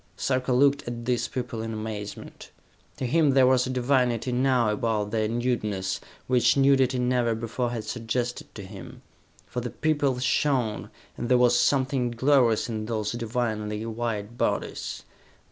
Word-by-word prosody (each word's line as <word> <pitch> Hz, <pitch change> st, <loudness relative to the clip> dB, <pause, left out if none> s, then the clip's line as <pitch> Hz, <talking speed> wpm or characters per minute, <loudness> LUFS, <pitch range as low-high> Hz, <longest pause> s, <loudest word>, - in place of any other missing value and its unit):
Sarka 130 Hz, -1 st, 0 dB
looked 140 Hz, +2 st, +3 dB
at 120 Hz, -1 st, -5 dB
these 125 Hz, 0 st, 0 dB
people 120 Hz, -3 st, -4 dB
in 115 Hz, 0 st, -4 dB
amazement. 110 Hz, -1 st, -7 dB, 0.5 s
To -, -, -3 dB
him 145 Hz, +1 st, +3 dB
there 130 Hz, -1 st, +6 dB
was 125 Hz, 0 st, +3 dB
a -, -, -4 dB
divinity 125 Hz, -1 st, +1 dB
now 125 Hz, -3 st, +2 dB
about 105 Hz, -1 st, -1 dB
their 110 Hz, -1 st, +1 dB
nudeness 105 Hz, -5 st, -1 dB, 0.3 s
which 125 Hz, +1 st, +3 dB
nudity 135 Hz, -2 st, +4 dB
never 125 Hz, -2 st, +1 dB
before 115 Hz, +2 st, -2 dB
had 115 Hz, -2 st, -4 dB
suggested 120 Hz, +2 st, -3 dB
to 100 Hz, -, -7 dB
him. 95 Hz, -, -11 dB, 0.4 s
For 125 Hz, -, -4 dB
the 120 Hz, -, -4 dB
people 145 Hz, -4 st, 0 dB
shone, 125 Hz, -3 st, 0 dB, 0.3 s
and 120 Hz, -, -4 dB
there 125 Hz, -, +5 dB
was 125 Hz, 0 st, +4 dB
something 130 Hz, 0 st, +2 dB
glorious 120 Hz, -2 st, +3 dB
in 110 Hz, -2 st, -4 dB
those 110 Hz, -2 st, -2 dB
divinely 110 Hz, -2 st, -2 dB
white 115 Hz, -1 st, -4 dB
bodies. -, -, -2 dB
120 Hz, 150 wpm, -26 LUFS, 110-130 Hz, 0.5 s, there